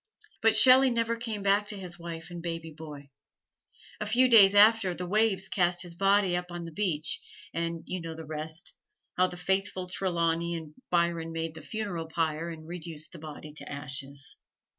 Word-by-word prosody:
But 225 0 +4
Shelley 260 +1 +8
never 230 -1 0
came 225 -3 -4
back 200 +1 +3
to 210 - -4
his 180 -2 -6
wife 170 0 -7
and 175 -1 -6
baby 165 -1 -5
boy. 145 -3 -10 0.9
A 210 - -3
few 245 +4 +4
days 205 -5 +8
after, 205 -3 +6
the 180 - -5
waves 195 0 +2
cast 175 -2 +1
his 175 -1 -8
body 195 0 +3
up 180 0 -2
on 175 -1 -6
the 165 - -8
beach, 155 -4 -1 0.3
and 165 0 -3
you 185 -1 -4
know 165 -1 -6
the 160 0 -8
rest 155 +2 -5 0.4
how 185 0 +4
the 180 - -8
faithful 190 0 -1
Trelawney 170 -2 0
and 160 -2 -7 0.2
Byron 170 -1 +1
made 165 -1 -3
the 160 - -10
funeral 200 -7 -4
pyre 160 0 -1
and 160 -1 -9
reduced 165 -2 -7
the 170 - -10
body 150 -1 -9
to 155 - -8
ashes. 140 -1 -2
170 Hz, 185 wpm, -29 LUFS, 160-195 Hz, 0.9 s, Shelley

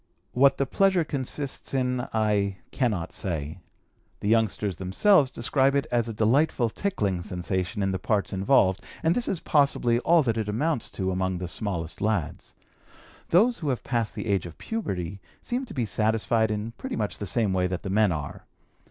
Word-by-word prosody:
What 135 +2 +4
the 140 - +1
pleasure 190 +4 +2
consists 140 -1 -3
in 125 -1 0
I 105 -3 +1
cannot 105 -11 -1
say. 80 -3 -4 0.6
The 100 - -1
youngsters 105 -4 +1
themselves 135 - +3
describe 135 +3 +1
it 140 - +1
as 120 -1 +1
a - - -2
delightful 120 +2 +2
tickling 105 - -1
sensation 95 +3 -2
in 95 - +1
the 95 - -2
parts 105 -3 0
involved, 95 -2 +3 0.2
and 165 +1 +4
this 245 - -1
is 180 - -2
possibly 140 -5 +2
all 165 +4 +4
that 115 -3 0
it 105 -1 -2
amounts 135 +5 -1
to 95 -1 -1
among 95 0 -1
the 90 0 -4
smallest 85 -2 -4
lads. 105 -6 -2 0.7
Those 225 +8 +4
who 150 - -2
have 125 -5 -2
passed 115 -3 -1
the - - -4
age 100 -5 0
of 85 - -12
puberty 95 - -4 0.2
seem 250 +2 -2
to - - -10
be 125 -4 0
satisfied 110 +1 +1
in 105 +1 -3
pretty - - -4
much 105 -2 -3
the 105 - -4
same 105 -1 +1
way 90 -1 +1
that 90 -1 -4
the 95 - -3
men 105 -1 +3
are. 75 -4 -5
110 Hz, 180 wpm, -26 LUFS, 95-135 Hz, 0.7 s, What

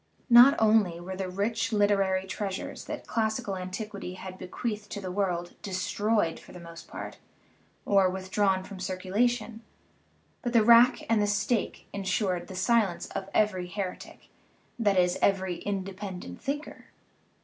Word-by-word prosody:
Not 245 +4 +9
only 215 -6 +3
were 185 +2 -6
the 190 -1 -4
rich 205 +4 -1
literary 195 -3 +2
treasures 190 0 -5
that - - -6
classical 220 -1 -1
an 185 -1 -5
tiquity 200 -2 -6
had 185 0 -9
bequeathed 210 +2 -4
to 205 - -4
the 185 -2 -5
world 180 -3 -1
destroyed 205 -1 0
for - - -15
the 180 - -9
most 170 -1 -11
part, - - -8 0.7
or 195 -2 +4
withdrawn 190 +1 0
from 190 0 -9
circulation, 215 +5 -1 0.8
but 240 -1 -3
the 230 -2 +5
rack 235 +2 +6
and 225 -2 +3
the 205 - +2
stake 210 +3 -1
insured 190 -2 -1
the 190 - -9
silence 190 -3 +1
of 195 - -5
every 190 -4 +2
heretic 185 +1 -6 0.5
that 205 -4 +2
is, 180 -1 +2
every 190 -3 +1
independent 190 - -5
thinker. 290 +2 -5
195 Hz, 145 wpm, -28 LUFS, 185-215 Hz, 0.8 s, Not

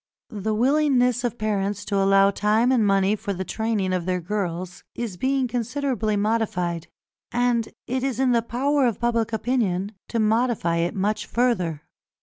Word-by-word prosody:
The 215 +1 -2
willingness 250 -1 +2
of 240 -1 -2
parents 205 -1 -1
to 200 - -2
allow 195 0 +4
time 215 +5 +2
and 245 -4 +3
money 195 +1 +3
for 210 -1 -4
the 190 0 -4
training 215 -4 -1
of 180 -1 -2
their 180 0 0
girls 180 -1 -4
is 230 -6 -4
being 265 +5 0
considerably 240 -2 -1
modified, 195 -6 -1 0.4
and 240 -1 +1 0.2
it 260 +1 -2
is 265 -3 -1
in 265 -1 +3
the 235 -1 +3
power 265 +4 +1
of 230 - -2
public 230 -2 0
opinion 215 -5 0 0.2
to 235 - -2
modify 220 -5 +1
it 170 +1 -1
much 205 +2 -1
further. 185 -11 0
220 Hz, 160 wpm, -24 LUFS, 195-245 Hz, 0.4 s, allow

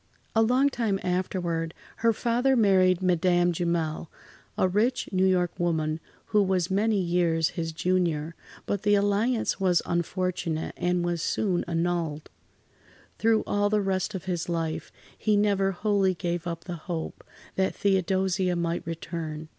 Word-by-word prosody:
A 225 - +5
long 250 +5 +3
time 225 -7 -1
afterward, 175 -3 -2 0.2
her 230 0 +3
father 240 +4 +1
married 190 -5 +4
Madame 175 0 +3
Jumel, 165 -2 -1 0.5
a - - +3
rich 215 +7 +1
New 190 0 +3
York 180 -2 +2
woman 160 -2 0 0.3
who 210 - +5
was 185 -2 0
many 210 +2 +2
years 170 -3 +1
his 165 -2 -4
junior, 165 -2 0 0.3
but 200 - -2
the 205 0 +3
alliance 205 +4 +1
was 185 -3 +3
unfortunate, 170 -1 -2
and 175 0 0
[Pg - - -1
74]was - - -5
soon 185 +1 0
annulled. 165 -3 -2 0.9
Through 225 -1 +3
all 205 0 +1
the 210 0 +2
rest 195 0 -1
of 190 - -6
his 175 -2 -2
life, 165 -2 -2 0.2
he 210 -1 +1
never 200 -2 +2
wholly 195 -1 +1
gave 175 +1 -3
up 165 -1 -4
the 175 -1 -6
hope 165 -2 -4 0.3
that 190 0 0
Theodosia 190 -1 +1
might 170 0 -1
return. 160 -2 -5
180 Hz, 145 wpm, -27 LUFS, 170-200 Hz, 0.9 s, A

